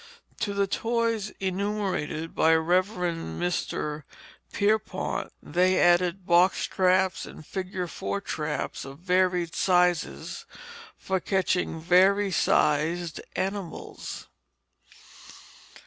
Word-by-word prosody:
To 200 -1 -2
the 200 0 +2
toys 230 0 -1
enumerated 190 -5 -2
by 160 0 +4
Rev. 175 +4 +3
Mr. 175 -4 -3 0.5
Pierpont, 210 -2 -1
they 180 +4 +2
added 175 +1 +3
box 175 +2 +4
traps 185 0 +1
and 155 - -11
"figure 185 0 -4
4" 190 +3 -4
traps 150 -6 -3
of 135 +1 -9
various 180 -1 +1
sizes 180 -2 +1 0.5
for 190 -1 -1
catching 185 -3 0
vari 190 +4 +4
sized 160 +1 +1
animals. 195 -3 -5
180 Hz, 90 wpm, -27 LUFS, 170-195 Hz, 0.5 s, by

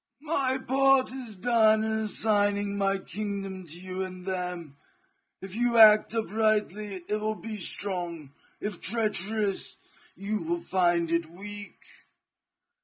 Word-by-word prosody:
My 275 -4 +1
part 270 0 +3
is 245 -6 -6
done 220 0 +4
in 220 - -1
assigning 205 -2 +1
my 195 -1 +1
kingdom 195 -1 -5
to 165 +3 -7
you 185 0 -5
and 185 -1 -6
them. 180 -6 -4 0.7
If 190 -1 -6
you 235 +1 +1
act 215 0 +7
uprightly 215 -3 0
it 210 - 0
will 215 0 -1
be 220 0 -7
strong, 175 -6 -4 0.3
if 205 -4 -5
treacherous, 210 -2 -1 0.4
you 210 +2 -3
will 345 +1 -2
find 175 - +1
it 170 -1 +1
weak. 205 +4 -9
205 Hz, 125 wpm, -28 LUFS, 185-220 Hz, 0.7 s, act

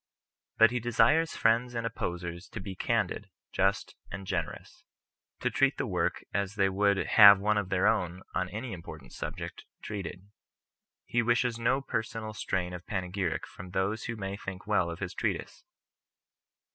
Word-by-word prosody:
But 115 0 +7
he 125 - 0
desires 120 +8 +3
friends 120 +2 +2
and 115 0 -2
op 115 - -2
posers 85 0 -4
to - - -4
bo 95 0 -6
candid, 90 - -1 0.2
just, 95 +1 0
and 95 +2 -6
generous; - - -4 0.6
to - - 0
treat - - +2
the - - -1
work - - -1
as 100 +2 -1
they 100 -2 +3
would 100 +1 +2
have 100 -1 +8
one 105 +2 +2
of 95 -3 -4
their 95 -1 +2
own 90 +1 +1
(on 90 -1 -1
any 110 +4 -5
im 90 - -7
portant 75 -7 -11
subject) - - -6 0.2
treated. 100 -1 -6 0.7
He 120 0 +1
wishes 120 0 +1
no 125 +4 +2
personal 110 -3 -3
strain 95 -4 -2
of 90 0 -8
panegyric 95 -2 -2
from 90 +1 -11
those 95 +4 -1
who 115 - -3
may 100 -2 -4
think 95 -1 -7
well 105 -5 +2
of 85 - -5
his 95 -1 -5
Treatise. - - -3
100 Hz, 170 wpm, -30 LUFS, 90-115 Hz, 0.7 s, have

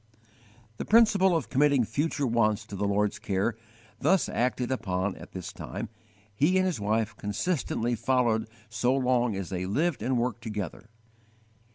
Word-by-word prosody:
The - - -3
principle 205 -5 +5
of 155 - -5
committing 140 -1 +4
future 145 +6 -1
wants 110 -3 +1
to 105 - -8
the 100 +1 -1
Lord's 100 0 0
care, 100 +3 -1 0.4
thus 190 -3 +3
acted 125 0 -1
upon 95 -5 -1
at - - -12
this 90 -1 -6
time, 105 +4 -6 0.4
he 150 - +3
and 185 - +3
his 180 -8 -1
wife 110 +1 0
consistently 120 - -1
followed 115 -1 +1 0.2
so 115 +4 +1
long 125 -4 +1
as 95 -2 -4
they 90 -1 -3
lived 145 - 0
and 130 0 0
worked 120 0 -1
together. 105 -1 -5
115 Hz, 155 wpm, -28 LUFS, 105-135 Hz, 0.4 s, principle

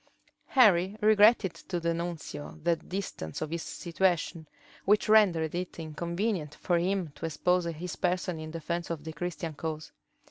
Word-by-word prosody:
Henry 200 -6 +4
regretted 210 -2 +5
to 175 +1 -5
the 170 0 0
nuncio 165 -3 -5
the 170 0 +3
distance 165 - -5
of 155 0 -4
his 170 0 -2
situation, 170 -3 -1 0.4
which 210 +2 +3
rendered 185 -8 +4
it 180 +1 -4
inconvenient 170 +1 -2
for 175 -2 +1
him 185 -1 0
to 150 +3 -4
expose 180 +2 +1
his 170 +1 -5
person 180 -2 -1
in 155 0 -6
defence 170 +1 -4
of 165 -3 -4
the 160 0 -6
Christian 170 0 -4
cause. 155 0 -5
170 Hz, 150 wpm, -29 LUFS, 160-185 Hz, 0.4 s, regretted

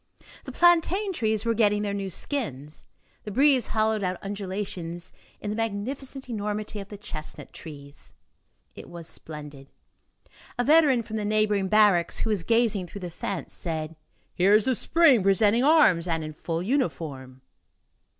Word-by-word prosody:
The - - -6
plantain 350 +4 +3
trees 220 - -1
were 230 - +2
getting 210 -2 +2
their 200 -1 -2
new 200 -1 -3
skins. 150 - -4 0.4
The - - -6
breeze 270 +1 +4
hollowed 220 -1 0
out 185 -1 -1
undulations 190 -4 -5 0.3
in 205 - -4
the - - -3
magnificent 250 +5 -4
enormity 210 -2 -4
of 200 0 -9
the 205 - -8
chestnut 155 -6 -6
trees. 140 -3 -11 0.6
It - - -11
was 170 -1 -9
splendid. 150 -4 -8 0.9
A 245 - +1
veteran 290 -4 +4
from 220 0 -5
the 210 - -2
neighboring 210 -2 +1
barracks, 200 -4 +3
who 225 - 0
was 200 -5 0
gazing 225 -3 +1
through 200 +3 -9
the 180 -1 -6
fence, - - -5
said: 160 -1 -4 0.4
"Here 195 +3 +4
is 215 - +3
the 260 - +2
Spring 280 -2 +4
presenting 205 +5 +3
arms 275 - +4
and 165 -2 -1
in 155 0 -6
full 165 +2 -4
uniform." 140 - -3
205 Hz, 155 wpm, -26 LUFS, 170-230 Hz, 0.9 s, breeze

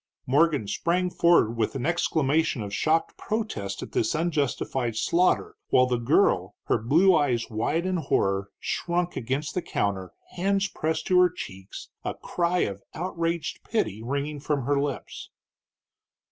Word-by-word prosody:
Morgan 145 -4 +2
sprang 170 - 0
forward 170 -12 +4
with 115 +3 -1
an 125 - -2
exclamation 160 -5 +1
of 100 -1 -6
shocked 160 +8 +1
protest 210 - -3
at - - -9
this 110 - 0
unjustified 140 -7 -1
slaughter, 185 - +1
while 125 - +5
the 125 -1 0
girl, 115 - +2
her - - +1
blue 165 - +4
eyes 125 -7 +1
wide 115 +10 0
in 185 -1 0
horror, 100 - 0
shrunk 175 0 -1
against 135 +5 -2
the 180 - -1
counter, 95 - -2 0.2
hands 195 +2 +1
pressed 160 -3 -2
to 180 -1 +4
her 180 0 +6
cheeks, 95 - -9
a - - -3
cry 175 +1 0
of 100 -1 -2
outraged 170 -1 -2
pity 110 - -1
ringing 140 +4 -3
from 140 -3 -1
her 140 +1 +2
lips. 145 -2 -5
150 Hz, 145 wpm, -26 LUFS, 115-175 Hz, 0.2 s, her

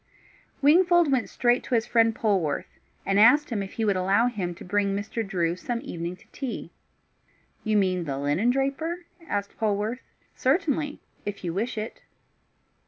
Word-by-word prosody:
Wingfold 345 +1 +5
went 255 -3 +1
straight 245 0 +2
to 250 - 0
his 225 -1 +2
friend 230 -2 +3
Polwarth, 195 - -1 0.3
and 195 +1 +2
asked 260 +7 +6
him 215 -3 -1
if 195 - -6
he 225 - -1
would 200 -2 +2
allow 195 +5 +3
him 195 -8 -2
to - - -11
bring 200 +1 +1
Mr. 215 +3 -3
Drew 175 -4 0
some 235 +6 -3
evening 175 -9 -5
to - - -22
tea. 265 -4 -5 0.9
"You 215 -1 +2
mean 185 -3 +1
the 140 -3 -3
linen 145 - +1
draper?" 280 +7 -1 0.2
asked 200 0 -3
Polwarth. 215 +3 0 0.4
"Certainly, 295 0 0 0.2
if 205 -1 -5
you 170 -2 -2
wish 225 +6 -2
it." 215 +2 -5
220 Hz, 165 wpm, -26 LUFS, 195-255 Hz, 0.9 s, asked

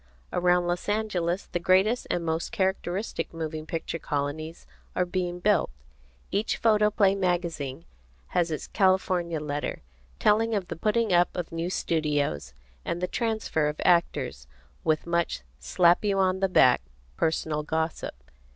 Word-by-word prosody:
Around 180 0 +3
Los 175 +3 -2
Angeles 195 -4 -1
the 175 - -3
greatest 190 +7 +3
and 170 -1 -1
most 160 0 -1
characteristic 190 +1 -1
moving 155 -1 -4
picture 165 +1 -3
colonies 150 +3 -3 0.3
are 180 - +2
being 180 -1 -2
built. 205 +3 +2 0.6
Each 210 +2 0
photoplay 210 -3 +3
magazine 170 -6 -2 0.4
has 175 -1 +1
its 155 - -3
California 185 -4 +1
letter, 145 - -4 0.3
telling 220 - +3
of 190 -3 -2
the 170 - -3
putting 215 +3 +1
up 175 0 +5
of 175 -2 -3
new 165 +1 -2
studios, 145 - -1 0.3
and 170 - -2
the 180 - 0
transfer 220 -9 0
of 150 0 -3
actors, 170 - +1 0.4
with 155 -1 +1
much 170 - 0 0.2
slap 175 - +3
you 200 -2 +1
on 190 -1 +2
the 195 0 +1
back 130 -8 +5 0.3
personal 155 - 0
gossip. 160 - -2
175 Hz, 140 wpm, -27 LUFS, 160-190 Hz, 0.6 s, up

